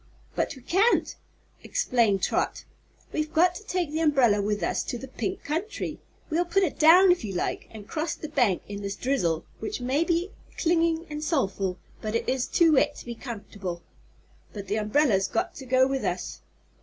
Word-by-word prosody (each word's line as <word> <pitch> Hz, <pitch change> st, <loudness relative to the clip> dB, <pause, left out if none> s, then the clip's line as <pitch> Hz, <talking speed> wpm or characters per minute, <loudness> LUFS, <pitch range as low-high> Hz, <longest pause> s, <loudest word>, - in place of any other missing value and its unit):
"But -, -, -1 dB
we 260 Hz, -, -14 dB
can't," 390 Hz, -, +2 dB, 0.5 s
explained 235 Hz, -, +1 dB
Trot. -, -, 0 dB, 0.5 s
"We've 310 Hz, 0 st, -1 dB
got 345 Hz, +3 st, +4 dB
to 360 Hz, -, -9 dB
take 360 Hz, -6 st, -2 dB
the 315 Hz, -, -1 dB
umbrella 265 Hz, -10 st, +4 dB
with 205 Hz, -2 st, -1 dB
us -, -, 0 dB
to 245 Hz, -, -3 dB
the 265 Hz, -, -8 dB
Pink 375 Hz, +8 st, -4 dB
Country. 380 Hz, +8 st, -3 dB, 0.3 s
We'll 335 Hz, +3 st, +2 dB
put 390 Hz, +3 st, +2 dB
it 340 Hz, -, -2 dB
down, 355 Hz, +4 st, +8 dB
if 355 Hz, -, +1 dB
you 195 Hz, -3 st, -4 dB
like, -, -, -2 dB
an' 220 Hz, -2 st, -10 dB
cross 310 Hz, +8 st, -3 dB
the 310 Hz, -, -7 dB
bank 245 Hz, -, +1 dB
in 205 Hz, 0 st, -6 dB
this 200 Hz, 0 st, -4 dB
drizzle 205 Hz, -11 st, 0 dB
which 220 Hz, -, -4 dB
may 260 Hz, +6 st, +1 dB
be 345 Hz, +3 st, 0 dB, 0.3 s
clingin' 330 Hz, -1 st, +2 dB
an' 300 Hz, 0 st, -4 dB
soulful, 195 Hz, -, -1 dB, 0.2 s
but 215 Hz, +1 st, -3 dB
is 255 Hz, -1 st, 0 dB
too 330 Hz, -2 st, +4 dB
wet 290 Hz, +1 st, +3 dB
to -, -, -10 dB
be 240 Hz, -, -5 dB
comfort'ble. 205 Hz, -7 st, -7 dB, 0.7 s
But 200 Hz, -2 st, -6 dB
the 205 Hz, +3 st, 0 dB
umbrella's 215 Hz, -2 st, +2 dB
got 225 Hz, -, -1 dB
to 265 Hz, -, -9 dB
go 260 Hz, +1 st, +4 dB
with 270 Hz, 0 st, -1 dB
us." -, -, -3 dB
270 Hz, 185 wpm, -26 LUFS, 210-330 Hz, 0.7 s, down